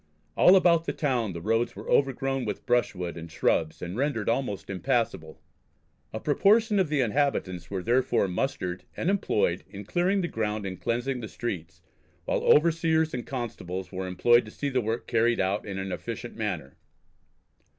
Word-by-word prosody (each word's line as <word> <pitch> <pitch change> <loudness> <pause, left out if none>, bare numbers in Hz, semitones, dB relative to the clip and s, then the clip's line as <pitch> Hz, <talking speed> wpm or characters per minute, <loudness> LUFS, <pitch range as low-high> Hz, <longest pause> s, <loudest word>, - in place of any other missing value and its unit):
All 185 - +7
about 170 -3 +4
the - - -2
town 120 - 0
the 85 - -6
roads 115 +5 0
were - - -9
overgrown 135 -1 +1
with 105 -3 -4
brushwood 95 -8 0
and 85 0 -8
shrubs 80 +1 0
and 90 +1 -5
rendered 130 -4 -1
almost 115 -6 -1
impassable. 95 -3 -1 0.7
A 110 - -4
proportion 205 - +3
of 185 -5 +2
the 150 -3 +2
inhabitants 105 - 0
were 95 -2 -3
therefore 120 -3 +2
mustered 90 -3 -2
and 180 - +1
employed 105 - 0
in 100 0 -9
clearing 185 - +1
the 175 - -1
ground 105 -5 -2
and 95 -1 -6
cleansing 125 +3 -1
the 110 - -6
streets, 85 -8 -6 0.4
while - - 0
overseers 160 0 +3
and 125 -1 -4
constables 105 -8 -5
were 95 -1 -4
employed 120 +6 +4
to - - -9
see 140 +6 -3
the 130 -2 +1
work 115 +1 -2
carried 115 +1 +2
out 95 +3 0
in 100 -2 -4
an 95 0 -4
efficient 120 +4 -6
manner. 95 -11 -4
115 Hz, 170 wpm, -27 LUFS, 95-140 Hz, 0.7 s, All